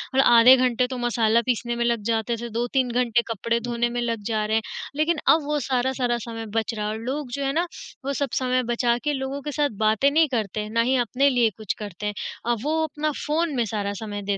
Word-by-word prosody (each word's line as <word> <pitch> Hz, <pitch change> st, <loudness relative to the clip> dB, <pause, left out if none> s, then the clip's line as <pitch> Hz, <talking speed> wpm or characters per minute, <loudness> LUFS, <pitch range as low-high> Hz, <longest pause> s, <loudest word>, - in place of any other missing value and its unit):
और -, -, +4 dB
आधे 240 Hz, +2 st, +8 dB
घंटे 250 Hz, 0 st, +2 dB
तो 255 Hz, -1 st, -5 dB
मसाला 235 Hz, -1 st, +2 dB
पीसने 240 Hz, -1 st, -1 dB
में 235 Hz, 0 st, 0 dB
लग 235 Hz, -2 st, +1 dB
जाते 225 Hz, +1 st, -1 dB
थे, 235 Hz, +1 st, -6 dB
2-3 245 Hz, +2 st, 0 dB
घंटे 240 Hz, -1 st, +2 dB
कपड़े 230 Hz, +3 st, -1 dB
धोने 240 Hz, 0 st, -1 dB
में 240 Hz, 0 st, -2 dB
लग 230 Hz, -2 st, -2 dB
जा 215 Hz, -2 st, 0 dB
रहे 220 Hz, +1 st, 0 dB
हैं, -, -, +1 dB, 0.3 s
लेकिन 310 Hz, +2 st, +1 dB
अब 315 Hz, -1 st, +5 dB
वो 295 Hz, 0 st, 0 dB
सारा 260 Hz, 0 st, 0 dB
सारा 240 Hz, -2 st, +1 dB
समय 225 Hz, -1 st, -6 dB
बच 225 Hz, +1 st, 0 dB
रहा 210 Hz, -1 st, -3 dB
है 210 Hz, -, -1 dB
और -, -, -4 dB
लोग 270 Hz, +1 st, -3 dB
जो 280 Hz, +2 st, -3 dB
है 270 Hz, -, +1 dB
ना 340 Hz, +2 st, +1 dB, 0.4 s
वो 280 Hz, -, -1 dB
सब 280 Hz, 0 st, -1 dB
समय 255 Hz, 0 st, +1 dB
बचा 240 Hz, 0 st, +1 dB
के 295 Hz, -1 st, 0 dB
लोगों 270 Hz, +1 st, -3 dB
के 295 Hz, -, -5 dB
साथ 290 Hz, 0 st, +1 dB
बातें 220 Hz, +6 st, +3 dB
नहीं 320 Hz, +1 st, +4 dB
करते 215 Hz, -4 st, -2 dB
हैं, 210 Hz, -, -6 dB
ना 230 Hz, 0 st, +2 dB
ही 255 Hz, +3 st, +2 dB
अपने 275 Hz, +5 st, +2 dB
लिए 240 Hz, -4 st, +3 dB
कुछ 215 Hz, -3 st, -3 dB
करते 205 Hz, -1 st, -7 dB
हैं, 210 Hz, -, -1 dB, 0.4 s
अब 235 Hz, -, 0 dB
वो 315 Hz, +2 st, 0 dB
अपना 305 Hz, 0 st, -2 dB
फ़ोन 310 Hz, 0 st, 0 dB
में 240 Hz, -2 st, +1 dB
सारा 205 Hz, -1 st, -3 dB
समय 205 Hz, -1 st, -5 dB
दे 195 Hz, -, 0 dB
240 Hz, 250 wpm, -24 LUFS, 225-270 Hz, 0.4 s, आधे